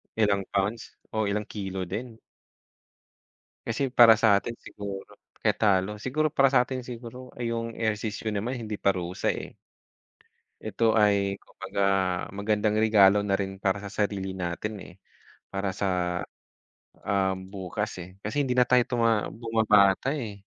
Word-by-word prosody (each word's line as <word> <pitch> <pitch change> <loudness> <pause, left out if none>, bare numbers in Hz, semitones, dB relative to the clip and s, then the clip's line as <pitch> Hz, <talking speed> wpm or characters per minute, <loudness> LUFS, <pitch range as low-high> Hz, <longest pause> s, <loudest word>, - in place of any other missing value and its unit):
Ilang 100 -3 +2
pounds 105 +4 -1 0.2
o 110 -1 0
ilang 105 +1 -1
kilo 95 -3 -5
din. 110 +6 -6 1.5
Kasi 125 +4 -1
para 115 -3 +7
sa 105 -3 +5
atin 120 +3 -4
siguro 100 -1 -8 0.2
kaya - - +2
talo 100 0 +2
siguro 155 +6 0
para 135 -2 +5
sa 130 -2 +5
atin 130 -1 -4
siguro 125 +1 -9
ay 120 -1 -2
yung 115 0 -3
ehersisyo 110 0 -2
naman 115 +6 -2
hindi 110 -3 -5
parusa 90 -3 0
eh. - - -7 1.1
Ito 110 +1 -3 0.2
ay 100 -1 +2
kumbaga 95 +1 -5 0.5
magandang 105 +1 0
regalo 105 -2 +6
na 100 -1 0
rin 95 -1 -5
para 95 0 +1
sa 100 - -7
sarili 100 -2 -1
natin 95 +4 -4
eh. - - -11 0.6
Para 95 -1 -2
sa, 100 0 -2 1.2
um, 95 -2 0
bukas 100 +3 -3
eh, 90 +2 -13
kasi 110 +8 0
hindi 125 -2 -1
na 125 - +6
tayo 125 -1 +5
tuma 115 -3 +1
bumabata 110 -1 +3
eh. 110 -6 -5
105 Hz, 145 wpm, -27 LUFS, 100-115 Hz, 1.5 s, para